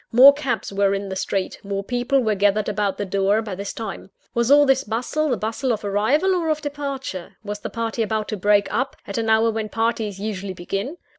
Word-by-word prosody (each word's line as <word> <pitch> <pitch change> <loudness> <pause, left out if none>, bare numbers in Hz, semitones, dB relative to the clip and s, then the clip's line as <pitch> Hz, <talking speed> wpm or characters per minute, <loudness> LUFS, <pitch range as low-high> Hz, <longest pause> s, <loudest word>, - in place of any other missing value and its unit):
More 260 +4 +9
cabs 265 -8 -3
were 200 0 +2
in 195 0 -4
the 190 - -4
street; 190 0 -2
more 200 0 -3
people 245 +4 +1
were 220 -3 +1
gathered 205 +1 +2
about 205 -2 -1
the 205 - -2
door, 195 +2 +2
by 210 -3 -5
this 200 +2 -4
time. 215 -3 -7 0.2
Was 235 +1 +1
all 290 +1 +7
this 270 0 +3
bustle, 250 +8 -1
the 250 - +1
bustle 225 +6 -1
of 215 -2 -2
arrival 255 - +2
or 340 -3 0
of 310 -1 +1
departure? 280 - -5
Was 205 0 -5
the - - -5
party 230 0 -3
about 215 -1 -1
to 215 - -2
break 205 +1 +3
up, 260 +5 -1
at 200 +3 -3
an 225 -1 -1
hour 220 +1 +4
when 220 -1 -3
parties 225 -3 -1
usually 200 -2 -4
begin? 195 - -4
220 Hz, 220 wpm, -22 LUFS, 200-255 Hz, 0.2 s, More